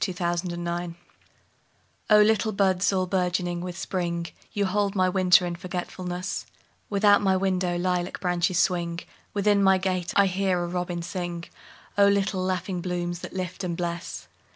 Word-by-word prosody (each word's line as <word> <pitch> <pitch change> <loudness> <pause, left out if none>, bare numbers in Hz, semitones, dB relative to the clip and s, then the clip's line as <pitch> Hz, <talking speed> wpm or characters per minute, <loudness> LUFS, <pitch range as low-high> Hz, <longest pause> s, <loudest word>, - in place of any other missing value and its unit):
A - - +2
Song 175 0 -1
in 175 0 -4
Spring 170 0 -3 1.1
O 210 -1 +7
LITTLE 220 0 +2
buds 190 -1 +2
all 185 -1 +1
bourgeoning 180 -1 -1
with 180 0 -6
Spring, 170 -3 -2 0.3
You 205 -1 0
hold 200 +1 0
my 185 -1 +3
winter 185 -1 +4
in 175 -1 -3
forgetfulness; 180 +1 -4 0.4
Without 205 0 +4
my 190 -2 +3
window 185 -2 0
lilac 180 0 -1
branches 180 0 0
swing, 170 -2 +1 0.3
Within 205 0 +3
my 190 -1 +5
gate 185 -2 -1
I 200 - +6
hear 185 -1 0
a - - -3
robin 175 -1 -3
sing—O 175 +3 -2
little 200 -1 +1
laughing 185 0 -2
blooms 175 -1 -3
that - - -8
lift 185 +1 -4
and 170 -2 -2
bless! 170 0 -4
180 Hz, 155 wpm, -26 LUFS, 175-190 Hz, 1.1 s, O